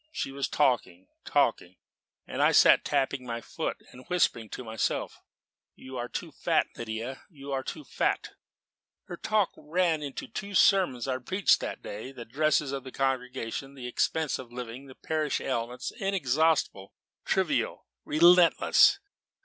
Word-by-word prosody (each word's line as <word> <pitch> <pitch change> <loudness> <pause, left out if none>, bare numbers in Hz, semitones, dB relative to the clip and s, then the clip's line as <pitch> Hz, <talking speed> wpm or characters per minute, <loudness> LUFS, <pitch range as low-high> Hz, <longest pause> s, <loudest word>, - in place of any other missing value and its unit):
She 135 - -3
was 140 0 -2
talking 120 -10 0 0.2
talking; 90 +1 +1 0.5
and - - -4
I - - +4
sat - - +6
tapping 135 -2 0
my 115 -1 -4
foot - - -4
and 125 - -13
whispering 115 -11 +1
to 125 - -7
myself, 110 -1 -2 0.6
'You 130 0 -10
are 120 0 -4
too - - -5
fat, - - +1
Lydia, 115 +3 -5
you 140 -5 -10
are 135 -1 -1
too 150 +3 -7
fat.' - - -1 0.7
Her 175 - -8
talk 215 +1 +1
ran 160 +1 0
on 140 -2 -5
the - - -5
two 205 -3 -6
sermons 180 - +4
I - - 0
had 130 -1 -7
preached 190 +1 +3
that - - -6
day, 110 +6 -7
the 125 -3 -9
dresses 150 +2 +1
of 135 -2 -4
the 130 - -9
congregation, 130 0 -3
the 130 -2 -8
expense 155 +4 0
of 125 -2 -10
living, 125 +2 -7
the 130 - -13
parish 155 -2 -1
ailments 120 -1 -3
inexhaustible, 160 - +1 0.3
trivial, - - 0 0.2
relentless. 170 +2 +5
135 Hz, 155 wpm, -28 LUFS, 125-160 Hz, 0.7 s, sat